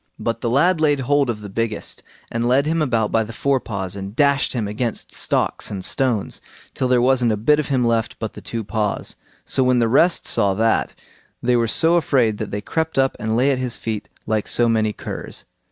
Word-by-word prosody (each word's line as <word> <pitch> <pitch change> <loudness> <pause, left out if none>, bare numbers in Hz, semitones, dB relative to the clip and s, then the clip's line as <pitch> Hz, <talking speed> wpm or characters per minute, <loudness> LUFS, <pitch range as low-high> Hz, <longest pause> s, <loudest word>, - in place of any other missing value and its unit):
But 115 0 -3
the 120 - -1
lad 160 +7 +3
laid 145 -3 +3
hold 140 0 +2
of 110 -3 -3
the 105 - -7
biggest, 110 +1 -3 0.3
and 115 +1 -1
led 130 +3 +3
him 160 +1 0
about 115 -7 +1
by 115 - +2
the 110 - -8
fore 135 +4 +1
paws, 95 -5 -5
and 100 +1 -7
dashed 140 0 +2
him 115 -5 -2
against 110 +2 -3
stocks - - -1
and 95 -2 -5
stones, 125 -7 -1 0.3
till 130 - -1
there 125 -1 +3
wasn't 125 -2 +3
a - - -2
bit 150 +8 +3
of 150 - -2
him 130 -3 +1
left 115 -1 0
but 110 -2 -5
the - - -10
two 115 -1 -4
paws. 105 0 -2 0.3
So - - 0
when 125 0 +3
the 115 -1 +3
rest 165 +9 +3
saw 100 -4 +1
that, 115 +2 +1 0.5
they 125 0 +3
were 115 -1 +2
so 165 +9 +4
afraid 125 -10 +1
that 110 - -4
they 105 - -4
crept 160 +8 -2
up 135 0 +2
and 110 0 -1
lay 135 +3 +3
at 130 - 0
his 125 -2 -3
feet 110 -2 -4 0.2
like 110 -1 -1
so 120 - +2
many 110 -2 +2
curs. - - -7
120 Hz, 220 wpm, -21 LUFS, 110-135 Hz, 0.5 s, so